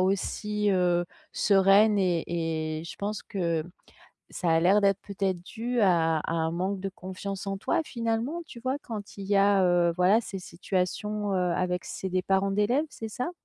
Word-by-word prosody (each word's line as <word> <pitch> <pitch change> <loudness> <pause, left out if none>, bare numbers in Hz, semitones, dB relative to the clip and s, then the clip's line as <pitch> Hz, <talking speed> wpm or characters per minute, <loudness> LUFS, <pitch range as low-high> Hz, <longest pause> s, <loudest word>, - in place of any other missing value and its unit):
aussi, 205 +2 0
heu, 175 -2 +2 0.3
sereine 200 +1 +5
et 175 -3 +1 0.6
et - - -9
je - - -8
pense 210 +1 -3
que 170 -5 -1 0.7
ça 175 - -2
a 165 0 +4
l'air 195 +4 +5
d'être 200 -1 +3
peut-être 190 -3 -2
dû 235 +5 -4
à 165 -4 +3
à 165 - -4
un 160 -1 0
manque 190 +2 -2
de 195 - -3
confiance 190 +1 -6
en 195 0 -2
toi, 330 - 0
finalement, 235 +7 -2
tu 235 - -11
vois? 260 +3 -1
Quand 210 -6 -8
il 195 - -6
y 200 - +2
a, 195 -1 +4
heu, 175 -1 +3
voilà, 185 +6 +4
ces 195 -3 -6
situations, 195 +3 -2
heu, 180 -1 +1
avec 180 -1 -1
c'est 190 - -5
des 185 0 0
parents 195 +1 +1
d'élèves, 220 +10 +1
c'est 225 -5 -7
ça? 250 +10 -3
195 Hz, 185 wpm, -27 LUFS, 180-210 Hz, 0.7 s, sereine